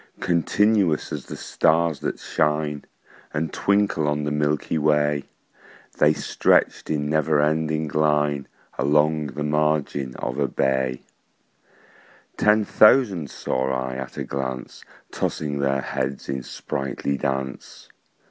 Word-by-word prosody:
Continuous 90 0 +2
as - - -6
the - - -6
stars 80 -1 +1
that - - -3
shine 75 -1 -1 0.5
And 75 +1 -2
twinkle 100 -6 +1
on 75 0 0
the 75 - -2
milky 75 +1 0
way, 75 -1 +2 0.7
The 75 - +6
stretched - - +1
in 75 -2 -1
never 75 0 +2
ending 80 +1 +1
line 75 -2 +1 0.3
Along 75 +2 +2
the 75 +2 -5
margin 75 -3 0
of 60 +3 -4
a 70 - +2
bay: 65 -1 0 1.3
Ten 105 0 +3
thousand 100 - +4
saw 65 0 -2
I 65 -1 -2
at 65 -1 -7
a - - -2
glance, 65 -2 -5 0.3
Tossing 75 -2 -2
their 70 -1 +1
heads 65 +1 -3
in 65 -1 -3
sprightly 70 +1 -3
dance. 65 -1 -4
75 Hz, 120 wpm, -23 LUFS, 70-80 Hz, 1.3 s, The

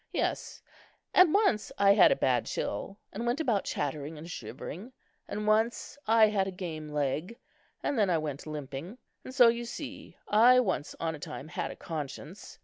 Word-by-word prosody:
Yes, - - -2 0.5
and 365 -3 +7
once 400 - +2
I 200 0 +6
had 205 - +7
a - - +4
bad - - +1
chill, 195 - -3 0.2
and 230 - -4
went 245 +5 0
about 235 -11 +1
chattering 145 +2 -3
and 155 +2 -9
shivering; 170 - -7 0.3
and 210 0 -4
once 220 +2 +1
I 225 0 +6
had 205 -3 +1
a - - -3
game 165 -5 -6
leg, 150 - -2 0.5
and 280 - 0
then 205 -3 +3
I 170 - +3
went 150 -2 -5
limping; 150 - -6 0.3
and - - -8
so, 255 -2 +7
you 235 +1 +1
see, 235 - -8
I 240 +4 +6
once 185 -10 -1
on 165 -1 -1
a 155 - -8
time 145 +1 -7
had - - -3
a - - -7
conscience. 155 +3 -7
195 Hz, 180 wpm, -29 LUFS, 155-230 Hz, 0.5 s, and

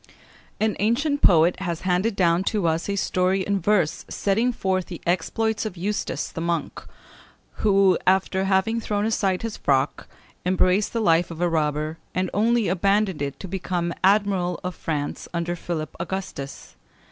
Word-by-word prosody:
An 215 0 +1
ancient 280 +8 +1
poet 170 0 +5
has 170 -3 -3
handed 185 +4 +1
down 175 -1 +3
to 205 -4 0
us 165 +3 0
a 200 - 0
story 185 0 +1
in 200 +1 0
verse 185 -4 +1
setting 220 +5 +1
forth 190 -5 -1
the 175 - -7
exploits 215 +6 0
of 215 -5 -5
Eustace 200 +4 -2
the 165 - -6
monk, 170 -1 -2 0.7
who, 195 -3 +4
after 190 0 +2
having 195 +4 +1
thrown 205 -1 -1
aside 195 -4 0
his 225 -2 -4
frock, 135 0 0 0.4
embraced 185 +2 +2
the 230 - 0
life 170 -3 +3
of 165 -1 -8
a 175 - +2
robber, 155 -1 -1 0.2
and 185 0 0
only 230 +1 +2
abandoned 195 -1 +1
it 140 -1 -3
to 190 - -7
become 175 -2 -2
Admiral 195 -3 +2
of 180 0 -3
France 150 -3 -4
under 170 +1 -1
Philip 165 -2 -5
Augustus. 185 -8 -6
185 Hz, 160 wpm, -24 LUFS, 170-205 Hz, 0.7 s, poet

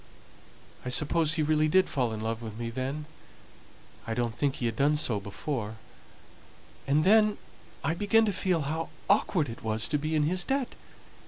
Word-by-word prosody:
I 125 - -4
suppose 155 +4 +2
he 155 - +1
really 155 0 +2
did 185 +4 +4
fall 125 -5 0
in 110 -1 -5
love 115 +1 -3
with 110 -2 -7
me 115 0 -4
then. 135 +5 -3 1.0
I 115 - -2
don't 120 -2 -1
think 140 0 0
he 120 - -3
had 115 -2 -1
done 145 +5 +3
so 120 -8 0
before. 105 +2 -4 1.1
And 145 +3 +3
then 215 +2 +5 0.5
I 160 - +1
began 210 +5 +3
to 205 - 0
feel 180 -3 +1
how 160 +3 -3 0.2
awkward 190 -5 +2
it 115 -1 -8
was 110 0 0
to 150 - +1
be 155 +2 -2
in 150 - +3
his 175 +4 +2
debt. 270 +2 -1
150 Hz, 180 wpm, -28 LUFS, 115-165 Hz, 1.1 s, then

